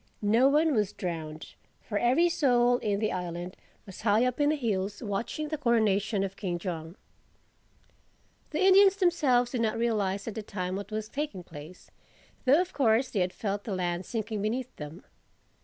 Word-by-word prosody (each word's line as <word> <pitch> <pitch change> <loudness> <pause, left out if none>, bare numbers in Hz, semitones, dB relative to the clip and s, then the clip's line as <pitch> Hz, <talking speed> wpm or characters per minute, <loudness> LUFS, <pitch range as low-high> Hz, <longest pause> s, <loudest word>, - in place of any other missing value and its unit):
No 230 +6 +4
one 305 +2 +3
was 210 -5 0
drowned; 160 -3 -6 0.3
for 205 -2 -2
every 260 +9 +4
soul 245 -7 +3
in 205 -1 -1
the 215 0 0
island 175 0 -5 0.3
was 195 - -10
high 215 +2 +3
up 250 +1 -1
in 290 - +4
the 305 - +2
hills 205 -5 -2
watching 235 +9 -3
the 310 -1 -3
coronation 220 -5 +2
of 195 0 -4
King 180 -4 -3
Jong. 170 -1 -5 1.5
The 310 - -2
Indians 390 0 +7
themselves 295 - +2
did 245 - -1
not 225 0 0
realize 205 -4 -1
at 225 - -3
the 220 - -4
time 185 -3 -4
what 200 +1 -6
was 215 0 -4
taking 275 -9 -4
place, 160 +2 -12 0.5
though 275 +5 +6
of 365 0 -2
course 255 0 +2
they 210 - -1
had 180 0 +1
felt 205 +1 -3
the 205 - -3
land 175 0 -2
sinking 220 -2 -3
beneath 245 +4 -3
them. 150 +5 -8
215 Hz, 175 wpm, -28 LUFS, 190-255 Hz, 1.5 s, Indians